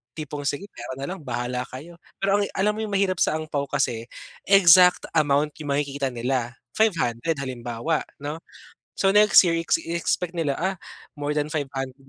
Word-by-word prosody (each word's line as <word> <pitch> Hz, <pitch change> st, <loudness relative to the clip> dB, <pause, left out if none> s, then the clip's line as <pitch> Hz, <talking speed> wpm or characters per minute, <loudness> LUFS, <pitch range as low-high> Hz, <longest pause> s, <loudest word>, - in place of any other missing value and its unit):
Tipong, 145 Hz, -2 st, -5 dB
"Sige, 145 Hz, +6 st, -2 dB
pera 120 Hz, +2 st, -7 dB
na 135 Hz, -, -7 dB
lang, 190 Hz, -, -6 dB
bahala 125 Hz, +1 st, -3 dB
kayo." 165 Hz, +7 st, -11 dB, 0.2 s
Pero 200 Hz, +1 st, +3 dB
ang 200 Hz, -, 0 dB
alam 205 Hz, +2 st, +2 dB
mo, 215 Hz, -, -7 dB
'yung 215 Hz, -2 st, -3 dB
mahirap 190 Hz, -2 st, +1 dB
sa 155 Hz, -, +2 dB
ampao, 155 Hz, -3 st, -3 dB
kasi 125 Hz, -5 st, -1 dB, 0.4 s
exact 180 Hz, -2 st, +6 dB
amount 150 Hz, -1 st, +2 dB
'yung 145 Hz, -2 st, -2 dB
makikita 140 Hz, -1 st, -1 dB
nila 125 Hz, -1 st, -2 dB, 0.2 s
500 165 Hz, -, 0 dB
halimbawa 130 Hz, +2 st, -3 dB, 0.2 s
'no 145 Hz, +3 st, -6 dB, 0.6 s
so 195 Hz, -, +4 dB
next 210 Hz, +1 st, +7 dB
year, 170 Hz, -3 st, +1 dB
iex-expect 170 Hz, +1 st, -1 dB
nila, 150 Hz, -4 st, 0 dB
ah, 190 Hz, +1 st, -1 dB, 0.4 s
more 145 Hz, +1 st, -1 dB
than 150 Hz, 0 st, -1 dB
500, 135 Hz, -4 st, -4 dB
150 Hz, 165 wpm, -24 LUFS, 135-175 Hz, 0.6 s, next